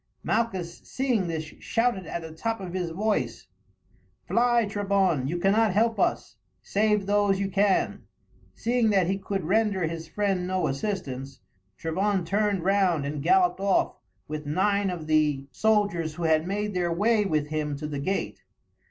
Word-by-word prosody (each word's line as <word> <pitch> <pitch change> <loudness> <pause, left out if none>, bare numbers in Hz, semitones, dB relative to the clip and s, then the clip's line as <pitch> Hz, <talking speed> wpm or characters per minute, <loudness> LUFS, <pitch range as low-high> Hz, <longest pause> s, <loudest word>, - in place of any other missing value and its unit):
Malchus 190 -7 -1
seeing 250 -8 -1
this 160 -1 -2 0.2
shouted 230 -6 0
at 170 - -4
the 160 - -8
top 225 +8 -3
of 185 -2 -7
his 180 -2 -2
voice: 205 +6 -1 0.8
"Fly, 240 -1 +3
Trebon, 195 -9 +1
you 170 +5 -2
cannot 205 +4 +3
help 225 0 +2
us, 115 - 0 0.3
save 210 -1 +1
those 205 -1 +2
you 195 -1 -1
can." 200 0 +1 0.5
Seeing 235 -1 +1
that 195 -4 +3
he 195 +3 -1
could 195 -1 -3
render 200 -1 +2
his 165 0 -5
friend 195 0 -1
no 185 0 0
assistance, 135 -5 -4 0.4
Trebon 190 +3 0
turned 200 0 0
round 185 -6 +2
and 145 0 -3
galloped 180 +2 +3
off 195 0 +2 0.3
with 150 0 -5
nine 200 +5 +1
of 175 -4 -5
the 150 -3 +2
soldiers 200 -8 +1
who 175 - -5
had 160 0 +2
made 210 +2 -2
their 175 -2 0
way 210 +5 +2
with 155 -6 -1
him 150 -2 -2
to 150 - -6
the 150 -2 -4
gate. 190 +8 -2
190 Hz, 160 wpm, -26 LUFS, 160-205 Hz, 0.8 s, Fly